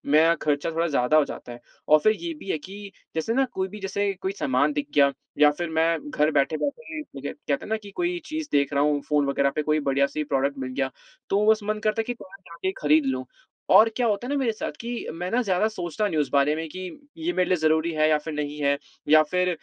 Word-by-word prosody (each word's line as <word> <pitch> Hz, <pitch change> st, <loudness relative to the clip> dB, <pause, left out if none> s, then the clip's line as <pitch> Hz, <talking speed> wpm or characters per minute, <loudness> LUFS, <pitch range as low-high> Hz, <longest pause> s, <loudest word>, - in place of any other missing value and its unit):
मेरा 165 Hz, +2 st, +6 dB
खर्चा 150 Hz, +2 st, 0 dB
थोड़ा 165 Hz, +1 st, 0 dB
ज़्यादा 140 Hz, +1 st, +2 dB
हो 150 Hz, -, +5 dB
जाता 120 Hz, -, -8 dB
है 120 Hz, -, -9 dB, 0.3 s
और 155 Hz, 0 st, +7 dB
फिर 215 Hz, +7 st, +4 dB
ये 340 Hz, -1 st, -3 dB
भी 195 Hz, -, -10 dB
है -, -, 0 dB
कि 200 Hz, +4 st, -10 dB, 0.2 s
जैसे 160 Hz, +8 st, -1 dB
ना, 270 Hz, +1 st, +3 dB
कोई 190 Hz, -6 st, -3 dB
भी 210 Hz, +2 st, -9 dB
जैसे 200 Hz, +1 st, -1 dB
कोई 190 Hz, -, -1 dB
सामान 140 Hz, +3 st, +2 dB
दिख 145 Hz, 0 st, -2 dB
गया 140 Hz, -1 st, +5 dB, 0.3 s
या 150 Hz, 0 st, +8 dB
फिर 175 Hz, -1 st, -3 dB
मैं 160 Hz, -1 st, 0 dB
घर 150 Hz, +2 st, +2 dB
बैठे-बैठे 285 Hz, -, -1 dB, 0.2 s
बजट 140 Hz, +1 st, -5 dB
कहते 140 Hz, -1 st, 0 dB
हैं -, -, -9 dB
ना 220 Hz, -, +1 dB
कि 200 Hz, -, -10 dB
कोई 355 Hz, 0 st, -1 dB
चीज़ 310 Hz, -1 st, -4 dB
देख 140 Hz, 0 st, +2 dB
रहा 140 Hz, +1 st, +3 dB
हूँ, 145 Hz, -1 st, +1 dB
फ़ोन 150 Hz, -1 st, +1 dB
वगैरह 140 Hz, 0 st, +2 dB
पे 155 Hz, -, +1 dB
कोई 155 Hz, +1 st, +1 dB
बढ़िया-सी 140 Hz, +2 st, 0 dB
प्रॉडक्ट 140 Hz, 0 st, 0 dB
मिल 130 Hz, -1 st, -4 dB
गया, 135 Hz, -1 st, -1 dB, 0.4 s
तो 205 Hz, +2 st, +2 dB
बस 220 Hz, -, +2 dB
मन 215 Hz, +1 st, -2 dB
करता 215 Hz, +1 st, +1 dB
है -, -, -4 dB
कि 245 Hz, -, -3 dB
पास 195 Hz, -4 st, -14 dB
जाके 180 Hz, +3 st, -3 dB
खरीद 150 Hz, 0 st, +4 dB
लूँ। 130 Hz, -1 st, -1 dB, 0.4 s
और 225 Hz, +1 st, +7 dB
क्या 245 Hz, -, +1 dB
होता 215 Hz, +3 st, -1 dB
है 285 Hz, -, -2 dB
ना -, -, +1 dB
मेरे 240 Hz, -4 st, +1 dB
साथ 215 Hz, -, -4 dB
कि 235 Hz, -, -6 dB, 0.2 s
मैं 180 Hz, +2 st, -4 dB
ना 245 Hz, -, +2 dB
ज़्यादा 195 Hz, +1 st, +2 dB
सोचता 195 Hz, -1 st, -3 dB
नहीं 165 Hz, -6 st, -2 dB
उस 150 Hz, -, 0 dB
बारे 140 Hz, +2 st, +3 dB
में 160 Hz, 0 st, -4 dB
कि 185 Hz, -, -8 dB, 0.4 s
ये 335 Hz, +2 st, -2 dB
मेरे 180 Hz, -, +1 dB
लिए 185 Hz, -, +4 dB
ज़रूरी 160 Hz, +1 st, +2 dB
है 155 Hz, 0 st, +3 dB
या 155 Hz, -, +4 dB
फिर 155 Hz, +1 st, -6 dB
नहीं 150 Hz, 0 st, -3 dB
है 140 Hz, 0 st, +2 dB, 0.3 s
या 155 Hz, 0 st, +8 dB
फिर 180 Hz, +3 st, 0 dB
160 Hz, 255 wpm, -25 LUFS, 145-205 Hz, 0.4 s, या